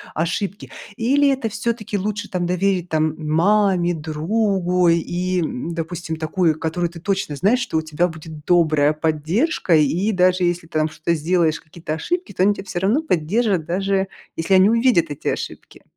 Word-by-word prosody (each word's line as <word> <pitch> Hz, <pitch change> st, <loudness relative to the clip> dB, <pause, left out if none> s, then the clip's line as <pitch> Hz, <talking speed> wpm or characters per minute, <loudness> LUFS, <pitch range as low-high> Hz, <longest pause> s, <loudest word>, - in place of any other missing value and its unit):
ошибки, 185 Hz, +5 st, -3 dB, 0.3 s
или 280 Hz, +5 st, +3 dB
это 260 Hz, -5 st, -1 dB
всё-таки 220 Hz, -2 st, -3 dB
лучше, 210 Hz, +2 st, -3 dB
там, 175 Hz, -2 st, -2 dB
доверить, 180 Hz, -1 st, 0 dB
там, 155 Hz, -1 st, +1 dB
маме, 175 Hz, +3 st, +2 dB
другу 180 Hz, +3 st, 0 dB
и, 175 Hz, +2 st, 0 dB
м, 160 Hz, +1 st, -4 dB
допустим, 165 Hz, 0 st, -4 dB
такую, 160 Hz, 0 st, 0 dB
которую 165 Hz, +2 st, -2 dB
ты 170 Hz, 0 st, -11 dB
точно 190 Hz, -5 st, -2 dB
знаешь, 210 Hz, -, +2 dB
что 245 Hz, -10 st, -2 dB
у -, -, +1 dB
тебя 160 Hz, +3 st, 0 dB
будет 160 Hz, -2 st, -10 dB
добрая 155 Hz, -4 st, +3 dB
поддержка? 160 Hz, -, 0 dB
И 165 Hz, +8 st, +2 dB
даже 185 Hz, 0 st, +3 dB
если 175 Hz, -1 st, -1 dB
ты 160 Hz, -1 st, -2 dB
там 155 Hz, 0 st, +1 dB
что-то 155 Hz, +2 st, -2 dB
сделаешь, 165 Hz, 0 st, +1 dB
какие-то 160 Hz, 0 st, -7 dB
ошибки, 355 Hz, -, -3 dB
то -, -, -2 dB
они 205 Hz, +2 st, +4 dB
тя 195 Hz, -, -7 dB
все 190 Hz, -2 st, -4 dB
равно 215 Hz, -, +1 dB
поддержат, 190 Hz, -, 0 dB
даже 195 Hz, +3 st, 0 dB, 0.3 s
если 165 Hz, +4 st, +1 dB
они 190 Hz, +2 st, +6 dB
увидят 230 Hz, -7 st, +3 dB
эти 145 Hz, -, -6 dB
ошибки. -, -, -5 dB
175 Hz, 170 wpm, -21 LUFS, 160-200 Hz, 0.3 s, они